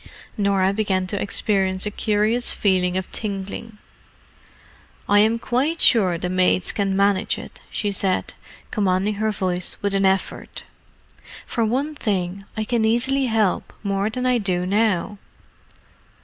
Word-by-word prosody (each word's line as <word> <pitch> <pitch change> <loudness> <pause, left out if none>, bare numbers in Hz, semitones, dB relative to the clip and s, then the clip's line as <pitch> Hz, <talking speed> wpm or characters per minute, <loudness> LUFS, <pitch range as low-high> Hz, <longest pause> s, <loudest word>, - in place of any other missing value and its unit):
Norah 195 -2 +2
began 195 -3 0
to 195 +1 -3
experience 195 -2 0
a 210 - -2
curious 215 +3 +1
feeling 185 -2 +1
of 190 - -4
tingling. 210 +1 -5 1.3
"I 205 0 +5
am 220 +2 +4
quite 260 +8 -1
sure 190 -8 +4
the 180 - -3
maids 185 0 +2
can 195 -2 -1
manage 200 0 +2
it," - - -10
she 205 - -2
said, 195 -1 -1 0.4
commanding 195 0 +1
her 220 - +2
voice 185 -3 -1
with 200 -1 0
an 195 0 +3
effort. 190 0 -2 0.8
"For 235 - -1
one 265 +7 0
thing, 195 -6 -2
I 220 - 0
can 230 0 0
easily 260 +4 +2
help 220 -5 0
more 200 0 0
than 250 +3 -3
I 250 -1 +3
do 180 -4 -1
now." 205 0 0
200 Hz, 140 wpm, -22 LUFS, 190-220 Hz, 1.3 s, I